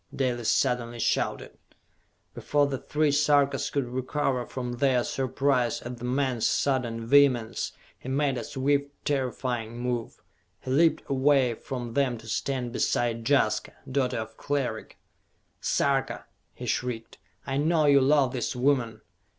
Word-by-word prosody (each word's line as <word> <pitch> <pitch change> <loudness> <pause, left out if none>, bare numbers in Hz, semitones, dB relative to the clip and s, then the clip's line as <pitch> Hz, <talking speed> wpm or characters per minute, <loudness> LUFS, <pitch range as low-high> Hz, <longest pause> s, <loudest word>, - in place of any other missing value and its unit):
Dalis 120 -4 0
suddenly 120 -2 +1
shouted. 115 - -1 0.7
Before 145 -1 +1
the 135 -2 -3
three 150 0 +1
Sarkas 145 -1 +2
could 140 -3 -1
recover 130 0 -2
from 125 -2 -4
their 130 -2 +2
surprise 130 -1 0
at 120 0 -7
the 125 - -5
man's 130 -2 0
sudden 120 -4 0
vehemence, 125 -3 +3 0.3
he 130 - -8
made 140 0 +1
a - - -5
swift, 140 +4 0 0.2
terrifying 125 -4 -2
move. 120 -1 -4 0.4
He 130 - -5
leaped 160 +4 +3
away 135 -2 +3
from 120 0 -6
them 135 -3 +1
to 115 0 -13
stand 125 +1 -2
beside 115 -1 0
Jaska, 140 -1 +2 0.2
daughter 130 -2 0
of 110 0 -6
Cleric. 135 -6 -3 0.6
"Sarka," - - 0 0.3
he - - -7
shrieked, 120 -2 -3 0.3
"I 135 0 -2
know 155 +1 +2
you 140 -1 +6
love 135 -1 +3
this 125 0 -2
woman! 125 -4 +1
130 Hz, 135 wpm, -27 LUFS, 120-140 Hz, 0.7 s, you